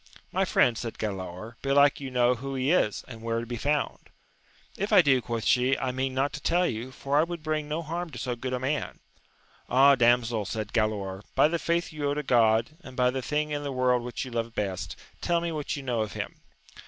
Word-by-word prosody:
My - - +1
friend, 120 - +3
said 115 -2 -5
Galaor, 100 +2 -5
belike 140 +1 +4
you 135 -2 -5
know 125 -1 +3
who 135 +3 -5
he 130 +3 +1
is, 110 - +1
and 115 -3 -10
where 115 0 -1
to 115 - -5
be 120 +1 -5
found? 145 +5 -1 0.7
If 200 - -3
I 180 - +7
do, 135 -4 +4
quoth 115 -1 -3
she, 125 +2 +3
I 130 - -1
mean 130 +1 -2
not 135 +2 0
to - - -6
tell 175 +2 +2
you, 120 -3 -3
for 140 +2 0
I - - +5
would 170 -1 -5
bring 155 -1 -2
no 160 +3 -2
harm 170 +2 -4
to 130 - -9
so 125 +1 -2
good 130 +2 -5
a 125 - -1
man. 140 +3 -2 0.7
Ah, 135 +3 +6
damsel, 120 -3 +3
said 110 -1 -4
Galaor, 100 -4 -1
by - - +6
the 170 +2 -1
faith 170 0 -1
you 145 -2 -1
owe 145 - 0
to 150 - -2
God, 115 -1 +3
and 130 - -11
by 125 0 +3
the 130 +1 -3
thing 150 +3 -1
in 145 0 -2
the 145 -1 -4
world 125 -1 +2
which 120 +2 -4
you 130 - -8
love 115 -1 -3
best, 95 -3 -3 0.3
tell 170 -1 +2
me 170 0 -2
what 150 -2 -3
you 140 - -6
know 120 -4 -1
of 105 -1 -3
him. - - -6
130 Hz, 235 wpm, -27 LUFS, 115-145 Hz, 0.7 s, I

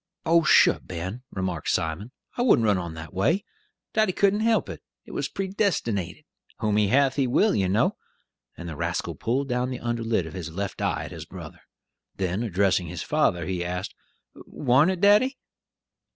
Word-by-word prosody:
"Oh, 165 0 +5
shuh, - - +5
Ben," 95 +7 -6
remarked 95 - -3
Simon, 80 +7 -1 0.3
"I - - -2
wouldn't 230 - +4
run 105 -3 +3
on 85 -2 -6
that 80 0 -9
way. 155 - +1 0.5
Daddy 215 -4 +2
couldn't 200 +2 +2
help 225 0 +2
it; - - -8 0.2
it - - -12
was - - -2
predestinated: 185 - -2 0.3
'Whom 105 -1 0
he 105 -1 +3
hath, 135 +5 +3
he 135 -2 +2
will,' 205 - +3
you 95 -2 +1
know," 105 +4 +1 0.6
and 85 - -7
the 80 - -6
rascal - - -2
pulled 135 +4 -1
down 125 0 -1
the 125 - -5
under 120 -1 -2
lid 115 -6 0
of 80 - -9
his 90 -4 -5
left 95 +4 -5
eye - - 0
at - - -9
his - - -8
brother. - - -10 0.5
Then 95 +2 -2
addressing 95 -4 +1
his 80 -1 -5
father, 110 - +1
he 90 -2 -2
asked, 90 +2 -4 0.4
"War'n't 135 +5 +2
it, 185 -2 -2
daddy?" 215 +7 +4
110 Hz, 180 wpm, -25 LUFS, -, 0.6 s, Oh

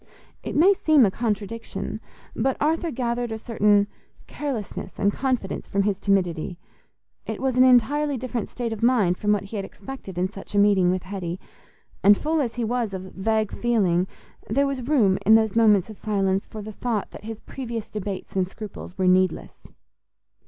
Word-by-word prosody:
It - - -5
may 360 +7 +6
seem 310 - +4
a 195 - +1
contradiction, 225 +1 -3 0.3
but 265 -1 0
Arthur 325 +3 +1
gathered 240 -3 -2
a 220 - -3
certain 210 -3 +3 0.4
carelessness 265 -9 -5
and 200 0 +2
confidence 255 -7 -2
from 200 0 +1
his 200 -1 0
timidity: 180 -4 0 0.7
it - - -4
was 265 -2 0
an 255 - +6
entirely 265 +3 +4
different 245 -3 -4
state 235 -2 -3
of 220 - -7
mind 220 -7 +3
from 210 - +1
what 210 -1 +1
he 200 +2 -6
had 200 - -2
expected 195 -2 -9
in 180 +1 +1
such 195 +1 -10
a - - +2
meeting 200 -3 +4
with 185 0 0
Hetty; 185 -2 -5 0.6
and 205 +1 +7
full 315 +1 0
as 240 -5 -2
he 240 - -2
was 230 -3 -1
of 185 0 -8
vague 215 +2 0
feeling, 190 -7 +1 0.4
there 280 +1 +2
was 265 -3 -3
room, 210 -11 +3
in 220 +3 +7
those 220 -2 +2
moments 210 -5 +5
of 215 -2 -11
silence, 195 -2 0
for 215 -1 -8
the 215 +1 -8
thought 225 -2 -2
that - - -11
his 225 -1 -6
previous 235 -4 -6
debates 200 -3 -5
and 185 -1 +1
scruples 205 -3 -9
were 190 - +1
needless. 185 -1 +1
215 Hz, 180 wpm, -24 LUFS, 195-245 Hz, 0.7 s, and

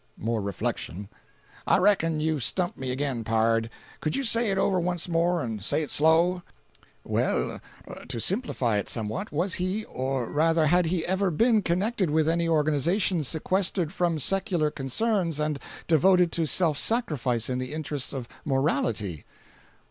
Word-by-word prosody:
More 115 0 -2
reflection. 100 -1 -4 0.6
"I - - +5
reckon 175 -5 +2
you've 155 -2 0
stumped 175 - -1
me 130 -1 -5
again, 130 -3 -2
pard. 115 0 +1 0.3
Could 155 - -2
you 275 - -1
say 230 -2 +4
it 195 - 0
over 190 -1 +2
once 175 0 -2
more, 170 0 +1
and 110 -5 -5
say 155 - +1
it 150 - -5
slow?" 165 +4 +3 0.6
"Well, - - -1 0.5
to 115 - -3
simplify 125 - +1
it 100 - -5
somewhat, 115 - -3
was 175 +6 0
he, 190 +4 -2
or 130 -1 -3
rather 160 +1 +2
had 175 +3 +3
he 170 -1 -1
ever 190 +1 +1
been 220 +6 +3
connected 190 +2 0
with 155 +1 +1
any 165 0 +1
organization 160 +4 +1
sequestered 175 +3 0
from 175 -3 0
secular 175 - +2
concerns 165 - -1
and 150 -1 -1 0.3
devoted 175 +2 +4
to 165 -2 -1
self 160 -3 +2
sacrifice 135 - 0
in 125 -1 -2
the 130 0 -5
interests 150 -3 -3
of 130 -4 -5 0.2
morality?" 120 - -1
160 Hz, 155 wpm, -26 LUFS, 130-180 Hz, 0.6 s, I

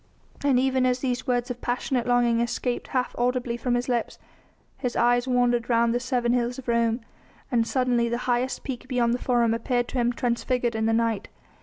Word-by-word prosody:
And 280 -3 +3
even 260 -1 +2
as 250 0 +2
these 255 -1 -2
words 245 0 0
of 245 - -7
passionate 245 0 -1
longing 240 -1 +3
escaped 240 +1 -2
half 255 -1 -1
audibly 245 -1 0
from 245 +1 -1
his 245 0 -1
lips 240 -2 -1 0.6
his 250 -3 -2
eyes 245 +1 +3
wandered 245 -1 +1
round 235 0 +3
the 245 - +1
seven 245 -1 0
hills 245 0 0
of 265 - -9
Rome, 235 0 +1 0.5
and 230 -2 +2
suddenly 245 -2 +1
the 235 - -1
highest 250 +1 0
peak 255 -1 -6
beyond 245 -2 +1
the 245 - -1
Forum 240 -3 +2
appeared 245 +1 0
to 260 - -2
him 240 0 +2
transfigured 240 0 -1
in 220 0 0
the - - +2
night. 225 -2 0
245 Hz, 195 wpm, -25 LUFS, 235-250 Hz, 0.6 s, And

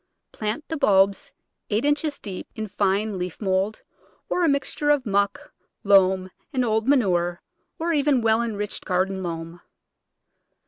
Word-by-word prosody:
Plant 220 +8 -4
the 320 - -3
bulbs 200 -7 +3 0.4
eight 215 +5 0
inches 290 +1 +1
deep 190 -3 -7
in 220 -1 -3
fine 200 0 0
leaf 180 -1 -5
mould, 195 +1 -1 0.5
or 360 - +1
a 330 - +4
mixture 285 +1 0
of 290 -3 +3
muck, 200 -1 -1 0.3
loam 190 -2 +4 0.2
and 255 -4 0
old 220 +1 0
manure, 175 -10 +2 0.3
or 335 0 -1
even 285 -4 +2
well 225 0 +3
enriched 210 -3 -3
garden 190 0 0
loam. 165 0 -6
210 Hz, 140 wpm, -24 LUFS, 190-260 Hz, 0.5 s, a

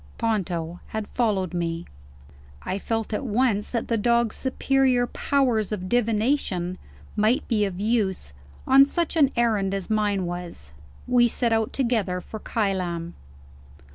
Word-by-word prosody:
Ponto 175 -6 -2
had 220 -1 -4
followed 200 -7 0
me. 170 -1 -2 0.8
I 190 +2 -2
felt 225 +1 -2
at 210 - -1
once 225 -3 +1
that 235 -2 -2
the 230 -2 0
dog's 235 0 +2
superior 260 -1 +2
powers 245 -5 0
of 185 -3 -3
divination 215 -5 0 0.4
might 215 +4 +2
be 215 -3 +2
of 190 -2 -5
use, 205 - 0 0.3
on 275 +1 +7
such 340 +3 -1
an 290 -5 +5
errand 215 -5 +1
as 195 +2 -5
mine 205 -3 +1
was. 175 - -6 0.4
We 245 -1 +5
set 235 0 +1
out 225 -1 +1
together 225 -8 0
for 220 +4 -8
Kylam. 180 -6 -2
215 Hz, 140 wpm, -25 LUFS, 185-240 Hz, 0.8 s, on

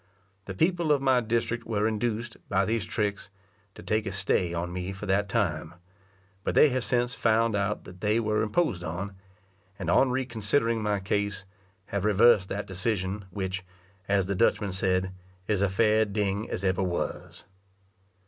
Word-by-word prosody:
The 95 - -6
people 170 - +2
of 145 - +4
my 130 -2 +3
district 115 +1 -1
were 110 -1 +1
induced, 115 +1 -2
by 95 -1 +2
these 110 0 -1
tricks, 105 -2 -2 0.5
to - - -11
take 110 -1 0
a - - -2
stay 95 -2 0
on 85 +1 -3
me 90 +1 -3
for 100 +2 -7
that 100 +1 +1
time; 85 -6 -1 0.7
but - - -1
they 150 - +7
have 130 -1 -1
since 125 0 0
found 115 -1 +2
out 100 +1 -1
that 90 0 -13
they 105 +2 +2
were 105 -1 +1
imposed 110 - 0
on, 90 +4 -4 0.6
and 90 -3 -2
on 130 +8 +5
re 130 +1 0
considering 115 0 0
my 105 -1 0
case, 100 0 -2 0.4
have 100 -2 -2
reversed 105 -1 +5
that 100 +1 -3
decision; 95 +1 -2
which, 95 -1 -4 0.4
as 100 -2 +2
the 100 - -1
Dutchman 100 +1 +1
said, 95 0 0 0.3
"is 105 -1 0
as 100 -2 +2
fair 110 +2 +3
a - - +4
ding 105 0 -1
as 90 - -3
eber 95 0 +1
was." 90 -2 -3
105 Hz, 175 wpm, -27 LUFS, 95-115 Hz, 0.7 s, they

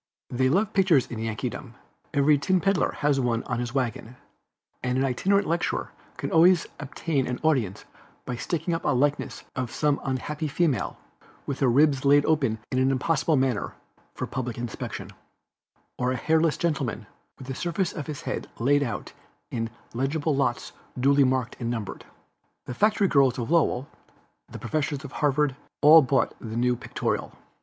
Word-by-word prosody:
They 130 +1 +2
love 195 +8 +1
pictures 180 -9 +4
in 115 - -7
Yankeedom; 115 +3 -4 0.4
every 145 0 +4
tin 185 +6 +2
peddler 195 0 +1
has 145 -2 +2
one 120 -3 0
on 120 - -3
his 120 +1 -4
wagon, 125 -2 -2 0.7
and 125 0 -1
an 135 - +2
itinerant 195 +10 +2
lecturer 170 +2 -1 0.3
can - - -4
always 170 +1 +5
obtain 145 0 -2
an 125 -1 -3
audience 130 -12 +1 0.4
by 125 - -3
sticking 170 +7 -2
up 165 - -2
a - - +2
likeness 145 +3 0
of 130 -2 -2
some 145 +2 0
unhappy 145 +4 -3
female, 150 -1 0 0.5
with 140 - -4
her 135 - +3
ribs 135 +2 +4
laid 145 +1 +5
open 135 -8 +2
in 130 - +1
an 130 +1 +3
impossible 150 +4 +1
manner, 130 -5 0 0.4
for - - -3
public 125 -3 -4
inspection, 120 -2 -5 0.9
or 125 0 +1
a - - 0
hairless 160 +1 +2
gentleman, 135 -9 -1 0.3
with 130 - -10
the 135 - -4
surface 175 +5 -2
of 150 - -6
his 150 -2 -6
head - - -4
laid 145 +5 +3
out 120 -6 -4 0.4
in 115 -1 -2 0.2
eligible 145 +5 0
lots 120 -3 -1 0.3
duly 140 +2 +4
marked 130 -2 0
and 120 -2 -2
numbered. 115 -4 -5 0.6
The - - -5
factory 210 - +3
girls 135 -7 +3
of 120 +3 -3
Lowell, 145 -5 +2 0.6
the - - -8
professors 150 -2 -2
of 135 - -8
Harvard, 145 -2 +1 0.3
all 155 +2 +10
bought 135 -1 +1
the 110 0 -6
new 125 +1 +2
Pictorial. - - -3
135 Hz, 165 wpm, -26 LUFS, 125-155 Hz, 0.9 s, all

